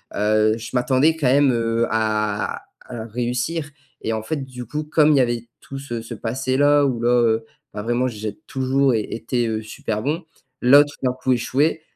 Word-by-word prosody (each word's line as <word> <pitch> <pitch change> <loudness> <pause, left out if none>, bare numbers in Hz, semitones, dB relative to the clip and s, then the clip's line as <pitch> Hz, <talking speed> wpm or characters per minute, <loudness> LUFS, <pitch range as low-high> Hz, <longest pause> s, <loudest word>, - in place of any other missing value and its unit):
heu, 110 +1 +2
je 115 - -7
m'attendais 130 +5 +3
quand 150 -5 0
même, 140 +1 +4
heu, 115 0 0
à 105 -2 -1 0.3
à 115 -2 -5
réussir 125 +7 -2 0.3
et 115 - -2
en 110 0 -3
fait, 155 +7 -2
du 125 -2 -8
coup, 150 +6 -4
comme 150 0 +3
il 145 - +4
y - - +5
avait 120 -1 -1
tout 135 - -8
ce 120 -4 -5
ce 115 0 -8
passé-là, 135 +5 +2
où 120 -3 -2
là, 120 - +2
heu, 115 -2 +2 0.3
bah 105 - -4
vraiment, 120 +2 0
j'ai 110 +4 -5
toujours 135 -1 +1
été, 115 +2 -2
heu, 110 -1 -2
super 110 0 -4
bon, 155 +7 -2 0.4
là 140 +4 +8
tout 145 - -11
d'un 125 -1 +1
coup 130 0 -2
échouer, 140 +6 0
125 Hz, 190 wpm, -21 LUFS, 115-135 Hz, 0.4 s, là